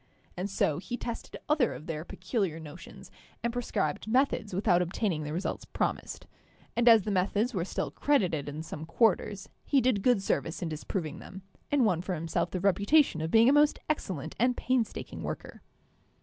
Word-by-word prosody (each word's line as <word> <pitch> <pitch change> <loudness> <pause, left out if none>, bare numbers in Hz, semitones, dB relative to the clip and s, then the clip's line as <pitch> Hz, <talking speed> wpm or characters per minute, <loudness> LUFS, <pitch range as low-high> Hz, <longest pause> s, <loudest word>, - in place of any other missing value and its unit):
And 185 +3 -3
so 155 -6 +1
he 240 +6 -5
tested 235 -2 -6
other 300 -5 +2
of 155 - -10
their 160 -2 -4
peculiar 185 -2 -2
notions 160 +2 -11 0.3
and 235 0 0
prescribed 220 -8 -2
methods 245 -2 +1
without 180 -1 +2
obtaining 180 -1 -1
the 150 0 -4
results 175 +5 -3
promised; - - -3 0.5
and 240 0 +5
as 225 -3 +7
the 210 - -2
methods 205 +6 +1
were 180 -5 0
still 185 - -3
credited 180 - +1
in 150 +2 -6
some 160 -1 -7
quarters, 200 0 +1 0.2
he 280 - +3
did 250 -5 +2
good 240 -3 +3
service 165 -2 -1
in 170 - -2
disproving 155 0 -4
them, 190 0 -10 0.3
and 285 -4 +4
won 180 -6 +2
for 185 0 -3
himself 165 +1 -1
the 185 - -3
reputation 200 - +3
of 160 - -2
being 225 +5 +6
a 270 - +6
most 295 0 +4
excellent 170 - -3
and 245 +1 +2
painstaking 250 -3 -1
worker. - - -6
195 Hz, 180 wpm, -29 LUFS, 165-240 Hz, 0.5 s, as